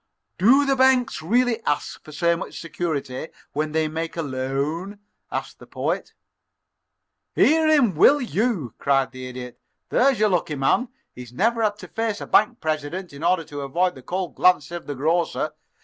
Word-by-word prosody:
"Do 260 +9 +5
the 275 -1 +2
banks 260 -5 +3
really 235 +6 +1
ask 145 - -2
for 155 - -12
so 170 +2 +2
much 165 - -7
security 155 -5 -4 0.3
when 155 +1 -1
they 160 0 +1
make 165 +2 -4
a 165 - -1
loan?" 140 +8 -3 0.3
asked - - -5
the - - -14
Poet. - - -3 1.2
"Hear 315 +1 +4
him, 285 -10 +4
will 280 - +6
you!" 220 - -1
cried 135 -1 +2
the 130 -1 -8
Idiot. 125 -1 -8 0.3
"There's 265 -3 +3
your 215 0 +4
lucky 170 -5 0
man. 140 - +2 0.3
He's 125 -1 -10
never 230 - +1
had 210 -2 +1
to - - -10
face 225 -2 -2
a - - -6
bank 235 +3 +3
president 155 +3 -3
in 140 +3 -9
order 175 0 +2
to 145 -2 -7
avoid 175 +7 0
the 130 - -12
cold 180 +5 -3
glances 170 -4 +3
of 175 -1 -6
the 145 - -4
grocer. 165 +5 0
170 Hz, 175 wpm, -23 LUFS, 145-220 Hz, 1.2 s, will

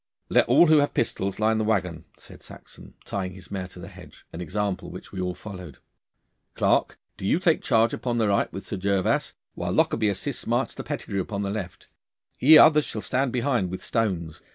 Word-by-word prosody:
'Let - - +3
all - - +6
who 155 -2 +5
have 145 - 0
pistols 100 -4 -1
line 110 +1 +2
the - - +1
waggon,' 90 -6 -1
said - - -14
Saxon, - - -14
tying 95 -2 -4
his 90 -1 -12
mare 95 -2 -4
to 90 - -15
the 85 - -9
hedge - - -14
an 85 - -6
example 95 +2 -3
which 90 - -10
we 95 - -5
all 90 0 -2
followed. 90 -7 -10 0.8
'Clarke, - - +1 0.2
do - - -10
you - - +3
take 170 -3 +2
charge 115 0 +2
upon 120 -2 -2
the 110 -2 +2
right 100 -1 +1
with 95 - -7
Sir 100 - -4
Gervas, 100 0 0 0.2
while - - -4
Lockarby 110 -2 +2
assists 100 - -4
Master - - -1
Pettigrue 100 -1 -4
upon 100 +2 -4
the 100 - -2
left. 95 -4 -6 0.5
Ye 155 +4 +8
others 150 -1 +6
shall 110 - -5
stand 130 +2 -1
behind 120 -6 0
with 95 - -6
stones. 90 -9 -2
100 Hz, 200 wpm, -25 LUFS, 90-115 Hz, 0.8 s, Ye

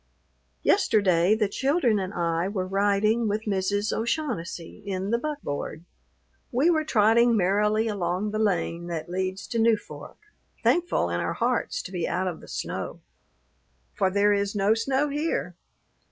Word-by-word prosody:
Yesterday 205 - +3
the 215 -2 +1
children 265 - +1
and 190 -1 -3
I 170 -1 0
were 195 -2 -2
riding 205 +4 +2
with 210 +1 -1
Mrs. 205 0 0
O'Shaughnessy 225 - -3
in 195 0 -3
the 235 - +2
buckboard. 175 - -4 0.7
We 275 +8 +3
were 315 -2 +2
trotting 230 -2 +4
merrily 210 +4 +2
along 195 0 -1
the 215 - -2
lane 175 -4 0
that 170 -1 -4
leads 185 +1 -3
to 230 - -1
Newfork, 225 -1 -1 0.5
thankful 350 0 +2
in - - -1
our - - -1
hearts - - -1
to - - -8
be 175 -3 -2
out 185 +1 -1
of 175 -3 -4
the - - -13
snow, - - -5 0.9
for 190 - +1
there 205 +2 +3
is 200 +1 -1
no 205 +1 +3
snow 265 +6 0
here. 290 - -2
205 Hz, 150 wpm, -26 LUFS, 185-230 Hz, 0.9 s, trotting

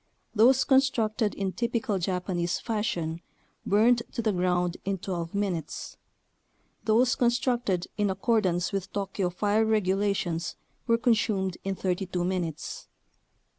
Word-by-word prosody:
Those 245 +4 +5
constructed 235 -5 +2
in 195 -1 -2
"typical 235 0 -1
Japanese 180 -1 -1
fashion" 175 -8 -2 0.5
burned 230 +4 +4
to 235 - -2
the 215 - +2
ground 180 -1 0
in 195 0 -1
12 170 -1 -4
minutes; 190 -5 -3 0.9
those 240 +4 +4
constructed 240 -6 +1
in 205 -1 +2
accordance 190 -3 +1
with 195 -1 -3
Tokyo 195 -2 -2
fire 205 +4 +1
regulations 195 -5 0 0.3
were 230 -1 +4
consumed 210 -6 +1
in 195 0 -2
32 185 -1 -2
minutes. 175 -4 -3
195 Hz, 115 wpm, -27 LUFS, 180-225 Hz, 0.9 s, Those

